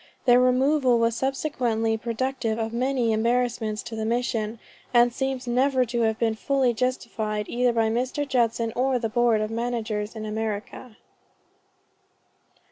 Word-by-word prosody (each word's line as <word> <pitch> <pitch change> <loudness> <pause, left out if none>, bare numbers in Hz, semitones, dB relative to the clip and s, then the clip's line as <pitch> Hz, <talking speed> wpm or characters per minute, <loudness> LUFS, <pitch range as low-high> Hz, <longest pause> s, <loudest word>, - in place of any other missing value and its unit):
Their 245 -1 +6
removal 255 0 +3
was 230 0 +1
subsequently 245 -5 -1
productive 235 0 -2
of 225 0 -3
many 250 -1 +1
embarrassments 230 -1 0
to 225 - -7
the 220 - -3
Mission, 230 -1 -1 0.4
and 240 0 +5
seems 265 0 -2
never 255 +1 +2
to 235 0 -2
have 220 -1 +1
been 225 -1 +1
fully 260 +2 +1
justified 220 -3 -2
either 245 0 +1
by 225 -1 +1
Mr. 260 +5 -1
Judson 230 -3 0
or 260 +1 +1
the 230 -2 -2
Board 235 -1 +2
of 215 +1 -2
Managers 225 -2 -3
in 215 -1 -5
America." 220 +2 -5
235 Hz, 140 wpm, -25 LUFS, 220-255 Hz, 0.4 s, Their